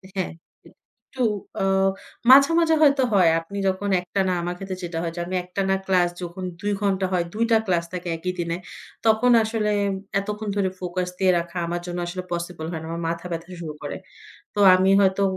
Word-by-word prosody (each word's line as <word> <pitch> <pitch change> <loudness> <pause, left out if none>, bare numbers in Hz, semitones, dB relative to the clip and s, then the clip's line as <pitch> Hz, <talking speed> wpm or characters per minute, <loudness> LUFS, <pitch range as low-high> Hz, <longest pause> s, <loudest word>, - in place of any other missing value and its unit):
হ্যাঁ, 185 - -2 0.7
একটু 255 -1 -4 0.4
আ - - +1 0.7
মাঝে, 275 +4 +8
মাঝে 325 -1 +3
হয়তো 280 -2 +5
হয় 180 -4 +5
আপনি 200 +5 -9
যখন 190 +2 -1
একটানা 190 0 -1
আমার 175 +1 -3
ক্ষেত্রে 190 -1 -6
যেটা 170 -1 -4
হয় 165 -1 -3
যে, - - -5
আমি 185 - -3
একটানা 190 +1 -1
ক্লাস 180 -2 +3
যখন 175 +2 -6 0.2
২ 205 0 -1
ঘণ্টা 195 -1 +1
হয়, 175 -1 +1
২ 225 +2 0
টা 225 - +7
ক্লাস 170 -2 +1
থাকে 180 -1 -5
একই 180 +2 -3
দিনে। 170 0 -1 0.5
তখন 225 +3 +4
আসলে 215 -1 -1 0.5
এতক্ষণ 210 +1 -4
ধরে 190 -2 +2
ফোকাস 180 0 -3
দিয়ে 190 -1 +4
রাখা 170 +1 -6
আমার 175 0 -3
জন্য 175 0 -4
আসলে 180 +1 -5
পসিবল 170 -2 -4
হয় 165 - -4
না - - -7
আমার 170 0 -4
মাথা 170 +1 -4
ব্যাথা 165 +2 -5
শুরু 155 -2 -5
করে। - - -4 0.6
তো 205 - -1
আমি 190 +1 +3
হয়তো 195 0 +3
185 Hz, 190 wpm, -23 LUFS, 175-200 Hz, 0.7 s, মাঝে